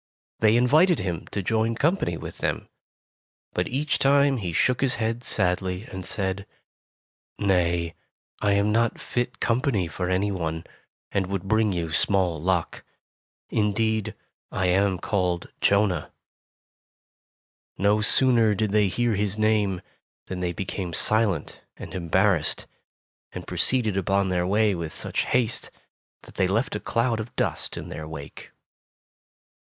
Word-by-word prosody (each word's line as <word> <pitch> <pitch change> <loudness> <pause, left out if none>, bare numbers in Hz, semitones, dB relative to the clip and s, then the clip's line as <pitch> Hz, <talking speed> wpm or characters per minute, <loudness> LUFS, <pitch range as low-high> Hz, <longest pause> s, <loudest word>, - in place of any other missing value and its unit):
They 110 +1 +4
invited 155 +8 +4
him 90 -5 -4
to 100 - -4
join 110 +3 +1
company 150 - 0
with - - -8
them, - - -2 0.9
but - - 0
each 145 +4 -1
time 140 0 +4
he 95 -7 -3
shook 125 +10 +1
his 135 -2 +2
head 115 +1 -2
sadly 90 -2 0
and 95 -1 -6
said: 95 0 -2 0.9
"Nay, 85 -4 +1 0.5
I 100 0 +2
am 100 +1 +2
not 115 +1 +1
fit 120 0 -3
company 115 -5 +1
for 90 +2 -4
any 95 +2 +1
one, 80 -3 -3 0.5
and 95 -2 0
would 95 -1 -3
bring 110 +1 +2
you 85 -3 -3
small 90 -2 +1
luck. 90 -1 -1 0.7
Indeed, 110 0 0 0.4
I 95 - -1
am 95 +1 +2
called 90 -2 -1
Jonah.'' 100 -2 +2 1.7
No 100 +2 +2
sooner 115 -1 +4
did 105 0 -1
they 105 -1 +3
hear 120 +4 0
his 105 0 -1
name, 105 -4 +1 0.4
than 95 - -5
they 90 -1 -1
became 90 0 -4
silent 105 -7 +1 0.2
arid - - -9
embarrassed, 90 -1 +1 0.7
and - - -7
proceeded 115 -6 +1
upon 95 0 +1
their 90 -1 0
way 105 +1 +3
with 85 -3 -5
such - - -1
haste 120 -2 +1 0.5
that - - -14
they 95 - +1
left 115 +9 0
a - - -2
cloud 115 -1 0
of 110 +2 -7
dust - - -2
in - - -7
their 80 0 -6
wake. 75 -3 -9
100 Hz, 140 wpm, -25 LUFS, 90-110 Hz, 1.7 s, They